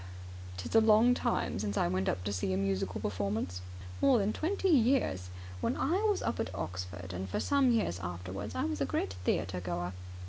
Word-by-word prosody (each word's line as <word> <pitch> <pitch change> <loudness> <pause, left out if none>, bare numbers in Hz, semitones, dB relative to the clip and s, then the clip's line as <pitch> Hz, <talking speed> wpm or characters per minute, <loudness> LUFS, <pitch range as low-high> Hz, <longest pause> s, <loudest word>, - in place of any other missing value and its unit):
"It's - - -5
a 225 - +8
long 220 +3 +6
time 240 - 0
since 100 0 -2
I - - +3
went 95 +2 0 0.2
to 100 - -1
see 95 0 -1
a - - +1
musical 95 -1 -1
performance. 100 -2 -2 0.4
More 270 -3 +6
than 210 0 +1
twenty 385 +4 0
years. 240 - +3 0.3
When - - 0
I 345 +9 +1
was 410 - +1
up - - -1
at 105 -4 -2
Oxford, 90 +1 -5
and 95 +1 -4
for - - -1
some 280 -2 +3
years 220 - +1
afterwards, 90 +3 -5
I - - 0
was 105 -1 -2
a - - +3
great 95 +1 -1
theatre 90 0 0
goer. 90 0 -3
95 Hz, 195 wpm, -32 LUFS, -, 0.4 s, a